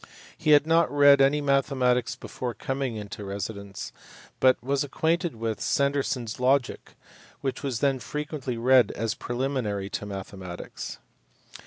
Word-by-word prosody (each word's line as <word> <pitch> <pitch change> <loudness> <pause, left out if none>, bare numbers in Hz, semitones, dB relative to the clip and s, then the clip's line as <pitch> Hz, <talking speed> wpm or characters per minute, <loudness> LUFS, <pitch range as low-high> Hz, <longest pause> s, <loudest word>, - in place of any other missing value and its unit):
He 155 - -2
had 145 0 +6
not 165 +1 +3
read 145 -1 +6
any 140 +2 +4
mathematics 135 -3 +1
before 120 -3 -5
coming 135 0 -3
into 105 -1 -7
residence, 100 0 -6 0.5
but 130 -1 +5
was 140 +2 0
acquainted 165 +2 0
with 110 -1 -3
Sanderson 140 -2 +1
s 115 +1 -6
Logic, 130 0 0 0.5
which 130 -2 -3
was 130 -5 -3
then 135 -2 +2
frequently 145 -3 -4
read 125 +1 +5
as 115 0 -2
preliminary 120 -6 -2
to 105 - -4
mathematics. 95 -2 -7
130 Hz, 135 wpm, -26 LUFS, 110-140 Hz, 0.5 s, had